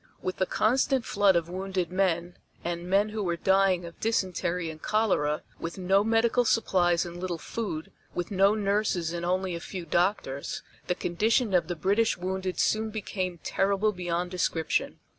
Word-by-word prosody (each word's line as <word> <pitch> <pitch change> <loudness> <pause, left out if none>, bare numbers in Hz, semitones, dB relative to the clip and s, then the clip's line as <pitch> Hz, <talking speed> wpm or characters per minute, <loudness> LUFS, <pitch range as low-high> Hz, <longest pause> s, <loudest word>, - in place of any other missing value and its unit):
With 185 - -4
the 185 - +1
constant 255 +2 +2
flood 200 -2 +3
of 170 -1 +1
wounded 185 -1 -3
men, 175 -2 0 0.3
and 175 +1 -4
men 200 +3 +3
who 215 0 -3
were 175 -3 0
dying 190 0 +3
of 170 - -11
dysentery 180 -5 -1
and 155 0 -12
cholera, 190 -9 +1 0.2
with 165 +2 -5
no 190 +2 +3
medical 225 +2 +3
supplies 180 -7 +2
and 175 0 -7
little 180 -2 -2
food, 165 -4 -5 0.2
with 175 +4 -3
no 195 +2 +4
nurses 200 -5 0
and 170 0 -4
only 185 +1 0
a 170 - -3
few 180 0 -6
doctors, 170 -5 -1 0.2
the 180 - +1
condition 215 +6 +1
of 180 - +3
the 175 - -2
British 200 +7 +2
wounded 185 +1 -3
soon 220 0 +2
became 190 -4 -3
terrible 200 +2 +1
beyond 175 -1 -2
description. 165 -3 0
185 Hz, 165 wpm, -28 LUFS, 175-205 Hz, 0.3 s, no